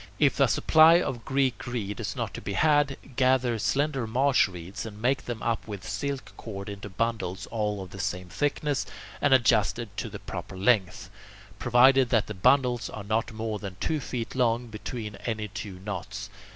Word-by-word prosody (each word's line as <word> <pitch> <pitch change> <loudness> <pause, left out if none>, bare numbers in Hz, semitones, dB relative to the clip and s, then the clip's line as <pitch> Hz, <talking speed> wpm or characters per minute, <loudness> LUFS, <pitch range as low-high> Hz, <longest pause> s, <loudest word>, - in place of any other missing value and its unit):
If - - +3
a - - +6
supply 160 +2 +6
of 120 -9 -3
Greek 135 -2 0
reed 110 -4 -3
is 105 -2 -3
not 115 -4 -3
to - - -6
be 100 - -4
had, 145 +3 +3 0.2
gather 130 -3 +2
slender 135 0 0
marsh 130 +3 +3
reeds, 90 0 -7
and 105 -2 -8
make 130 +4 +1
them 120 -3 -5
up 115 -1 -1
with 100 -4 -7
silk 140 -2 -4
cord 100 -3 -7
into 100 0 -7
bundles 105 -2 -2
all 105 -3 -1
of 90 - -12
the 100 - -9
same 90 0 -3
thickness 145 - -1 0.3
and 145 - +3
adjusted 115 -4 +3
to - - -3
the - - -7
proper 95 - -7
length, 95 -3 +1 0.5
provided 125 +1 +5
that 115 -4 +3
the 105 - -6
bundles 125 +4 +3
are 105 - -7
not 110 +3 -1
more 110 -1 -3
than 100 -2 -7
two 155 +6 0
feet 120 -3 -4
long 120 -2 +1
between 105 -1 -6
any 110 -2 -3
two 100 -1 -7
knots. 100 -5 -5
115 Hz, 180 wpm, -27 LUFS, 105-130 Hz, 0.5 s, a